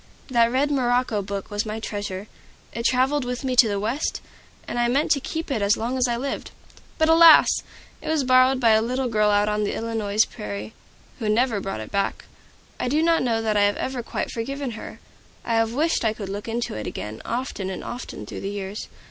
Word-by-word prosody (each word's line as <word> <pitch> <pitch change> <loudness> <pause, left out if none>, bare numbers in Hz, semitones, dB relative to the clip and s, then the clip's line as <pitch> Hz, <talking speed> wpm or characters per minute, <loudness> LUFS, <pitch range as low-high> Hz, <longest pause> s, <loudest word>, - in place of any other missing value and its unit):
That 235 -2 +3
red 280 +3 +1
morocco 245 -5 +1
book 200 0 -5
was 205 +1 -1
my 215 0 -4
treasure. 205 -3 -5 0.5
It 230 +1 -4
traveled 260 +3 +2
with 250 +1 -4
me 260 -1 -1
to 240 - +8
the 200 -1 -1
West, 230 +9 -2 0.5
and 240 - -3
I 240 - +3
meant 275 +5 +1
to 280 - +4
keep 320 +2 -5
it 230 -6 0
as 200 +1 +3
long 235 +3 -2
as 255 -1 +2
I 240 -1 0
lived. 275 +3 -4 0.5
But 315 - +3
alas! 325 0 +7 0.4
it - - -9
was 315 -3 +2
borrowed 255 0 +4
by 230 -3 +4
a 220 0 +5
little 255 +3 -1
girl 215 -2 +2
out 205 0 +3
on 210 0 0
the 205 - -1
Illinois 225 -3 -3
prairies, 105 +1 -6 0.5
who 220 -3 -1
never 225 0 +2
brought 190 - -4
it 110 - -9
back. 200 0 -1 0.5
I - - -1
do 300 +5 +2
not 330 0 +3
know 230 -3 0
that 215 -1 0
I 205 - +4
have 205 - +1
ever 260 -1 -3
quite - - -4
forgiven 270 +3 -4
her. 220 - -9 0.5
I 235 - -1
have 225 0 +2
wished 320 +1 +1
I 220 -1 +2
could 205 -3 -7
look 205 +2 -5
into 230 +1 -2
it 110 0 -5
again, 105 +1 -6
often 235 -6 -3
and 185 - -5
often 245 +1 -7
through - - -7
the 195 - -3
years. 200 0 -5
230 Hz, 220 wpm, -24 LUFS, 205-260 Hz, 0.5 s, to